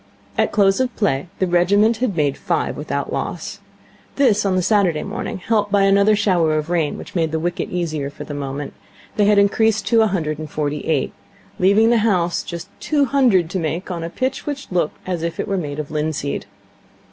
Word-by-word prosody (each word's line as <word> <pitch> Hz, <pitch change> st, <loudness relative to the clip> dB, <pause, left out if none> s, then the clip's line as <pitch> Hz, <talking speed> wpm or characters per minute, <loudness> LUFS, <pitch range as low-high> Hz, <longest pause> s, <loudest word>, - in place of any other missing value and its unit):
At -, -, +1 dB
close 195 Hz, 0 st, +3 dB
of 255 Hz, -2 st, -1 dB
play 145 Hz, -8 st, 0 dB
the 190 Hz, -, +1 dB
regiment 200 Hz, +6 st, +3 dB
had 235 Hz, -5 st, -1 dB
made 145 Hz, -4 st, +1 dB
five -, -, -1 dB
without -, -, -3 dB
loss. -, -, -4 dB, 0.6 s
This, 235 Hz, -8 st, +3 dB
on 190 Hz, -, +1 dB
the 185 Hz, -, +1 dB
Saturday 190 Hz, -5 st, +2 dB
morning, 210 Hz, +1 st, -4 dB
helped 205 Hz, +1 st, 0 dB
by 200 Hz, -1 st, +4 dB
another 200 Hz, +2 st, +4 dB
shower 175 Hz, -7 st, +2 dB
of 155 Hz, +2 st, -3 dB
rain 165 Hz, -4 st, 0 dB
which -, -, -10 dB
made 165 Hz, -3 st, 0 dB
the 160 Hz, -, 0 dB
wicket 175 Hz, +2 st, -2 dB
easier 155 Hz, -5 st, -2 dB
for 145 Hz, -, -9 dB
the 145 Hz, -, -7 dB
moment, 140 Hz, 0 st, -5 dB, 0.4 s
they 205 Hz, -, +3 dB
had 205 Hz, 0 st, +4 dB
increased 215 Hz, +1 st, +3 dB
to 230 Hz, -2 st, +5 dB
a 220 Hz, -, +4 dB
hundred 155 Hz, -6 st, -2 dB
and 155 Hz, -1 st, -6 dB
forty 150 Hz, 0 st, -2 dB
eight, 150 Hz, -4 st, 0 dB, 0.5 s
leaving 205 Hz, +5 st, +4 dB
the 235 Hz, -, +4 dB
house 180 Hz, -6 st, +1 dB
just 170 Hz, -1 st, -7 dB
two 290 Hz, -2 st, +1 dB
hundred 240 Hz, -, +3 dB
to 190 Hz, -, -1 dB
make 170 Hz, +3 st, -3 dB
on 170 Hz, -2 st, -4 dB
a 165 Hz, -, -4 dB
pitch 260 Hz, -, -3 dB
which 285 Hz, -5 st, -5 dB
looked 175 Hz, -4 st, 0 dB
as 180 Hz, -3 st, -2 dB
if 170 Hz, 0 st, -3 dB
it -, -, -2 dB
were 200 Hz, -, -1 dB
made 150 Hz, -6 st, -3 dB
of 150 Hz, -1 st, -5 dB
linseed. 150 Hz, -5 st, -2 dB
185 Hz, 205 wpm, -20 LUFS, 155-210 Hz, 0.6 s, to